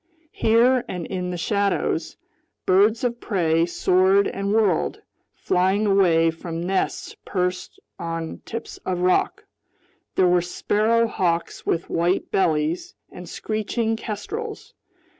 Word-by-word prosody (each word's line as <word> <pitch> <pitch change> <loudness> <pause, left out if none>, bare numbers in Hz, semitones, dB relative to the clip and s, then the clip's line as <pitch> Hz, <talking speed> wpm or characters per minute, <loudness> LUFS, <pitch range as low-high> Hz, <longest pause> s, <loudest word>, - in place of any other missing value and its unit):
Here 240 +3 +3
and 180 -3 -5
in 180 -1 -3
the 180 - -3
shadows, 200 +3 -1 0.5
birds 210 +6 +3
of 240 -1 -1
prey 165 -5 +1
soared 185 +3 +3
and 200 0 -3
whirled, 210 -6 +1 0.4
flying 190 +4 +1
away 175 -5 +4
from 165 0 -6
nests 190 +1 -2
perched 180 -1 -3 0.2
on 165 -1 -4
tips 230 0 -7
of 180 -1 -3
rock. 180 0 +1 0.7
There 185 - +4
were 175 0 +4
sparrow 215 +6 +1
hawks 175 -6 -2
with 170 - 0
white 175 +3 0
bellies, 160 -2 0 0.2
and 180 -1 -10
screeching 220 +1 -2
kestrels. 415 - -6
185 Hz, 120 wpm, -23 LUFS, 175-215 Hz, 0.7 s, away